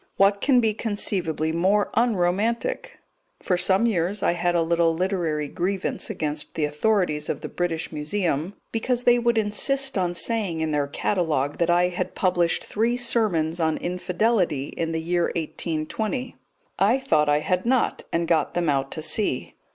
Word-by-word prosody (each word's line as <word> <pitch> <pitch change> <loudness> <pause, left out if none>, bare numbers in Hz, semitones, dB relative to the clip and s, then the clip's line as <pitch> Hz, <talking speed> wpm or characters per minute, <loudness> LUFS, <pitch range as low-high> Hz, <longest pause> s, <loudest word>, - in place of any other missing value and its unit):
What 200 0 +3
can 265 -3 +4
be 220 -2 +2
conceivably 185 -7 -1
more 190 +5 +1
unromantic? 230 - 0 0.4
For 180 - 0
some 190 +4 +3
years 195 -2 0
I - - +3
had 175 0 0
a 170 - +3
little 165 0 +2
literary 170 -5 -1
grievance 185 +5 -2
against 150 -1 -4
the 155 - +1
authorities 150 0 0
of - - -3
the 155 - -5
British 165 0 -3
Museum 160 +2 -2 0.2
because 245 +2 -1
they 245 0 +5
would 235 -1 +1
insist 225 +4 +1
on 175 -1 -1
saying 200 -5 -1
in 160 -1 -1
their 145 -1 0
catalogue 150 -3 -1
that 170 - +1
I 175 +1 +3
had 180 - -4
published 175 -3 +1
three 230 +3 0
sermons 195 -9 +1
on 160 -1 +1
Infidelity 180 - 0
in 165 -1 -2
the 160 0 -2
year 175 0 +1
1820. 175 - -3 0.4
I 210 +6 +4
thought 155 - +2
I 145 0 +3
had 180 +6 -1
not, 255 -1 +1
and 170 0 0
got 160 -3 +1
them 175 -2 +1
out 135 -1 0
to 155 - -5
see. 160 - -1
175 Hz, 165 wpm, -24 LUFS, 160-215 Hz, 0.4 s, they